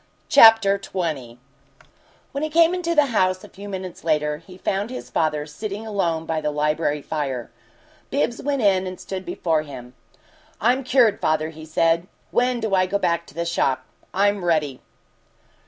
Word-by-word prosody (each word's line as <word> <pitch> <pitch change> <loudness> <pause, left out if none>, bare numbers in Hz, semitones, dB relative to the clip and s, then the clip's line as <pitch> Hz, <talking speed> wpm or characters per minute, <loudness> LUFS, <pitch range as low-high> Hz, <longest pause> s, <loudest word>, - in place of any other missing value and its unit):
CHAPTER 225 -3 +7
XX 155 -12 -4 0.9
When 280 - -4
he 310 - -1
came 335 +2 +4
into 340 -2 -1
the 300 - +6
New 275 - -4
House, 185 -3 +1
a - - -11
few 200 +1 -10
minutes 185 -2 -6
later, 150 -2 +1
he 180 +4 -14
found 195 +3 -2
his 255 - -8
father 150 -2 0
sitting 205 +8 -6
alone 170 -7 -1
by 160 -1 -2
the 150 - -1
library 150 0 0
fire. 135 -6 -3 0.6
Bibbs 250 -4 -1
went 280 -3 -1
in 190 -2 +3
and 185 0 -7
stood 190 -1 -6
before 165 -3 0
him. 130 -5 -10 0.7
"I'm 250 +4 +2
cured, 250 -5 +3
father," 155 0 +1
he 160 0 -11
said. 165 +2 +1 0.2
"When 245 0 +1
do 220 -3 -2
I 185 -1 +3
go 200 +2 0
back 170 -3 0
to - - -16
the 170 0 -2
shop? 140 -6 0 0.3
I'm 200 0 +1
ready." 150 -6 0
185 Hz, 170 wpm, -23 LUFS, 155-215 Hz, 0.9 s, CHAPTER